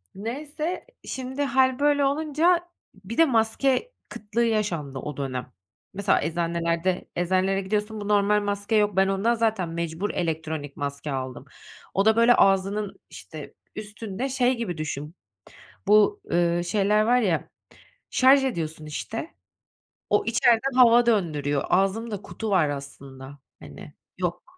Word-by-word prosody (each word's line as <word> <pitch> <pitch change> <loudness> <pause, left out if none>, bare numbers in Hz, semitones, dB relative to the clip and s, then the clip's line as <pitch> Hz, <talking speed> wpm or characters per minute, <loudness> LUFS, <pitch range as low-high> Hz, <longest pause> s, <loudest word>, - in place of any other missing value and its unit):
Neyse, 290 - -4 0.2
şimdi 260 +2 -5
hâl 260 -1 +2
böyle 290 -1 +3
olunca 315 +5 +1 0.2
bir 195 +3 -9
de 330 - +7
maske 255 - +1 0.2
kıtlığı 215 +3 -2
yaşandı 170 -12 -1
o 150 0 -6
dönem. 130 -2 -4 0.4
Mesela 200 0 +1
eczanelerde 170 +2 -1
eczanelere 185 +2 +1
gidiyorsun, 210 +2 -2
bu 205 - -5
normal 210 0 +3
maske 205 +2 -1
yok, 210 -1 +2
ben 190 0 +4
ondan 195 +5 +1
zaten 220 -6 0
mecbur 170 +4 -3
elektronik 160 -3 -3
maske 145 +1 -4
aldım. 130 -1 -5 0.5
O 195 - +1
da, 220 0 +5
böyle, 230 +1 +6
ağzının, 195 0 +1
işte, 150 -3 -10 0.2
üstünde 215 +3 -5
şey 255 -1 +2
gibi 195 -8 -4
düşün, 155 +1 -5 0.7
bu, 215 - +4
eee, 175 0 +2
şeyler 210 +2 +2
var 240 +3 +3
ya 190 -8 0 0.6
Şarj 265 +1 +5
ediyorsun, 160 -10 -4
işte, 225 - -6 0.8
o 205 - +3
içeriden 240 +3 +2
hava 240 -1 +6
döndürüyor. 150 -11 0
Ağzında 200 +3 0
kutu 220 +1 -6
var 180 -7 +3
aslında, 140 -1 -8 0.2
hani. - - -12 0.2
Yok. - - -3
205 Hz, 130 wpm, -25 LUFS, 170-235 Hz, 0.8 s, de